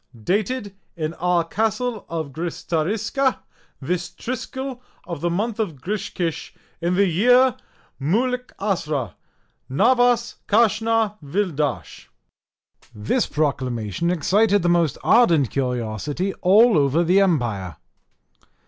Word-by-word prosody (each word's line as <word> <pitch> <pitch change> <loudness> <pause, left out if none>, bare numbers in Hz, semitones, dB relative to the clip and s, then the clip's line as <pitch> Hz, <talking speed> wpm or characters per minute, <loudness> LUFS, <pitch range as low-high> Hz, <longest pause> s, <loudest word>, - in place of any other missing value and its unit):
Dated 205 - -1 0.2
in 155 0 -2
our 175 0 +1
Castle 220 +5 -2
of 160 -4 -4
Gristariska 200 - -1 0.4
this 175 +5 -2
Triskill 260 +1 -5 0.3
of 170 -5 -6
the 175 - 0
month 210 +6 -2
of 195 -8 -1
Griskish, 175 -2 -4 0.3
in 175 +2 0
the 200 +2 +4
year 245 +8 +4 0.5
Moulikasra 195 - -1 0.6
navas 245 - +2
kashna 225 0 +2
vildash. 150 -2 -2 0.9
This 110 - 0
proclamation 130 - -1
excited 200 +4 +2
the 175 - +2
most 170 -5 +2
ardent 170 - +4
curiosity 125 - -2
all 205 +1 +5
over 145 +4 +2
the 185 +4 +4
empire. 120 - 0
180 Hz, 100 wpm, -22 LUFS, 150-225 Hz, 0.9 s, all